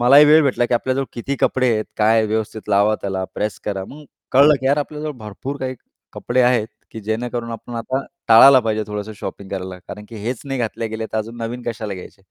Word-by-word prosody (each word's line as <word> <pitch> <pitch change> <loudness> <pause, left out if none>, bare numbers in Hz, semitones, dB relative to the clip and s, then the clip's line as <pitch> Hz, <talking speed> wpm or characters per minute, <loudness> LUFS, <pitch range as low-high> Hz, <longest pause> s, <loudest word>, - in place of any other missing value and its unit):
मलाही 135 +5 +8
वेळ 155 +1 +7
भेटला, 125 -3 +1
की 120 - +1
आपल्या 130 +2 0
जवळ 135 - 0
किती 135 +4 -3
कपडे 130 -2 +2
आहेत? 110 -1 0
काय 110 +1 +4
व्यवस्थित 110 0 -3
लावा 100 +1 +4
त्याला, 95 -1 -2
प्रेस 105 0 -2
करा. 95 -2 -3
मग 150 +2 -11 0.3
कळलं, 145 +3 +7
की 130 - -2
यार 140 +2 +4
आपल्याजवळ 150 +1 -4
भरपूर 110 +6 -6
काही 130 0 -3 0.4
कपडे 125 +1 0
आहेत, 120 -3 +3 0.2
की 110 - -8
जेणेकरून 115 +2 -3
आपण 115 +2 -8
आता 130 +4 -2 0.2
टाळायला 130 +4 +9
पाहिजे 110 -2 -1
थोडंसं, 105 0 -5
शॉपिंग 100 -1 -7
करायला 95 -1 -5
कारण 105 - -8
की 115 - -9
हेच 125 +1 -2
नाही 135 -1 -3
घातले 115 0 -2
गेले, 110 0 -4
तर 110 - 0
अजून 115 +2 -5
नवीन 120 +2 -4
कशाला 110 -3 -4
घ्यायचे? 95 +1 -11
115 Hz, 215 wpm, -20 LUFS, 105-130 Hz, 0.4 s, टाळायला